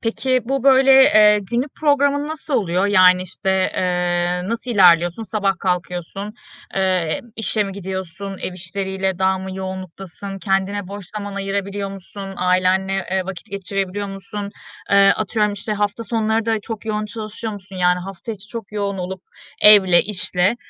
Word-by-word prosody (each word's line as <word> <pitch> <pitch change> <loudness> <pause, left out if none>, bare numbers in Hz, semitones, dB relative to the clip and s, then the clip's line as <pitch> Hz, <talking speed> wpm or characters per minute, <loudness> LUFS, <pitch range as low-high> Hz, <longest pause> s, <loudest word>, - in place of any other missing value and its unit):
Peki, 255 +3 0
bu, 270 +1 -2
böyle, 270 0 +6
eee, 210 -3 +6
günlük 250 +4 -1
programın 285 -1 +2
nasıl 310 -2 -4
oluyor? 185 -2 +1
Yani, 185 -2 +5
işte, 185 +1 -3 0.2
eee, 180 0 0
nasıl 230 +2 -3
ilerliyorsun? 175 -2 +4
Sabah 200 -3 -1
kalkıyorsun, 180 +3 -3 0.4
eee, 185 -4 0 0.2
işe 220 -1 0
mi 195 - -5
gidiyorsun, 190 0 -6
ev 185 - -4
işleriyle 190 +1 -3
daha 190 0 +2
mı 190 0 -6
yoğunluktasın, 190 +1 -7
kendine 195 0 -1
boş 200 0 -7
zaman 205 -1 -5
ayırabiliyor 200 0 -3
musun, 195 0 -9
ailenle, 185 +1 +2 0.2
eee, 190 -1 0
vakit 195 +2 -8
geçirebiliyor 195 0 -3
musun? 200 +1 -6 0.4
Eee, 200 0 +6
atıyorum, 210 0 0
işte, 205 +2 -4
hafta 210 +2 -2
sonları 225 0 0
da 225 -1 +1
çok 220 +1 -7
yoğun 215 -1 -1
çalışıyor 215 0 -4
musun? 190 -1 -10
Yani, 180 0 +3
hafta 195 +4 -7
içi 205 -1 -11
çok 225 -3 -6
yoğun 200 -2 -2
olup 185 +1 -5 0.4
evle, 195 -4 +7
işle, 185 +1 0
195 Hz, 150 wpm, -20 LUFS, 185-215 Hz, 0.4 s, evle